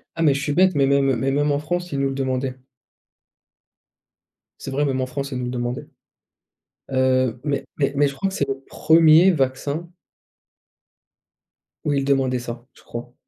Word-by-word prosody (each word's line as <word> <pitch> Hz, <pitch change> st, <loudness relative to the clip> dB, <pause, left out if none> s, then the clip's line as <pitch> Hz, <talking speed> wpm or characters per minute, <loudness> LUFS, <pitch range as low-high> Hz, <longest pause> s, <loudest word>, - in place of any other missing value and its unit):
Ah 165 Hz, -, -3 dB
mais 145 Hz, -3 st, +5 dB
je 140 Hz, -, -2 dB
suis 145 Hz, -, -1 dB
bête, 185 Hz, +2 st, +4 dB
mais 140 Hz, -1 st, +3 dB
même, 140 Hz, -1 st, +3 dB
heu, 130 Hz, -, +2 dB
mais 135 Hz, +3 st, 0 dB
même 145 Hz, +1 st, +1 dB
en 140 Hz, -, 0 dB
France, 175 Hz, +3 st, -3 dB
ils 140 Hz, -, -1 dB
nous 135 Hz, -, +1 dB
le 135 Hz, -, -4 dB
demandaient. 130 Hz, -1 st, -2 dB, 2.0 s
C'est 135 Hz, -, -6 dB
vrai, 145 Hz, +2 st, 0 dB
même 130 Hz, -1 st, -1 dB
en -, -, 0 dB
France, 135 Hz, +2 st, -5 dB
ils 130 Hz, -, -3 dB
nous 125 Hz, -, -3 dB
le 125 Hz, -, -3 dB
demandaient. 120 Hz, 0 st, -4 dB, 1.0 s
Heu, 130 Hz, -2 st, +1 dB
mais 140 Hz, -1 st, -1 dB
mais 140 Hz, -1 st, 0 dB
mais 145 Hz, 0 st, +3 dB
je -, -, -8 dB
crois 195 Hz, -, -1 dB
que 190 Hz, -, -7 dB
c'est 140 Hz, -, 0 dB
le 135 Hz, 0 st, -3 dB
premier 165 Hz, +3 st, +5 dB
vaccin 140 Hz, +3 st, -2 dB, 1.9 s
où 145 Hz, -, 0 dB
ils 135 Hz, -1 st, 0 dB
demandaient 135 Hz, -2 st, +1 dB
ça, 120 Hz, 0 st, -7 dB
je -, -, -20 dB
crois. 120 Hz, +1 st, -8 dB
135 Hz, 190 wpm, -22 LUFS, 130-145 Hz, 2.0 s, mais